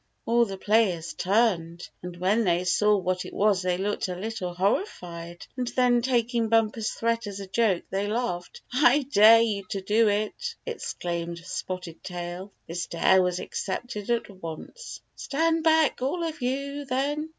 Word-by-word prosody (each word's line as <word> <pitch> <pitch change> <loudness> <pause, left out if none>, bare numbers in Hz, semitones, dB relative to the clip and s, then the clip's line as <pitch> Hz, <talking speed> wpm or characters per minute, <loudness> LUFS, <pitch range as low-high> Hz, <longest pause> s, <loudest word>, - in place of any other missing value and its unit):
All 235 +1 +4
the 195 -3 -6
players 190 -6 +1
turned, 180 -5 +1
and 180 -1 -7
when 195 +6 +2
they 175 -2 +2
saw 210 +3 +3
what 185 -1 -1
it - - -9
was 200 -2 +3
they 180 -1 0
looked 200 +2 -1
a 180 - -4
little 195 -1 -4
horrified, 175 - -2
and 250 -1 -2
then 245 -1 +3
taking 235 -2 +1
Bumper's 225 -1 +2
threat 230 -1 -1
as 200 -1 -6
a 200 - -6
joke 195 -2 +1
they 195 +1 -1
laughed. 210 -5 -3
" - - -17
I 275 +2 +5
dare 225 -1 +8
you 210 -3 0
to 195 -2 -3
do 215 +4 +3
it! 215 - -2
" - - -46
exclaimed 170 - -4
Spotted 185 -2 -5
Tail. 180 +2 -6 0.2
This 170 0 -4
dare 185 +3 +4
was 180 0 0
accepted 210 +1 -4
at 235 -1 +1
once. 185 - -9
"Stand 325 +2 0
back, 320 -4 +3
all 310 +7 -1
of 320 -3 -4
you, 280 +3 -2
then!" 285 +4 -1
210 Hz, 170 wpm, -26 LUFS, 180-245 Hz, 0.2 s, dare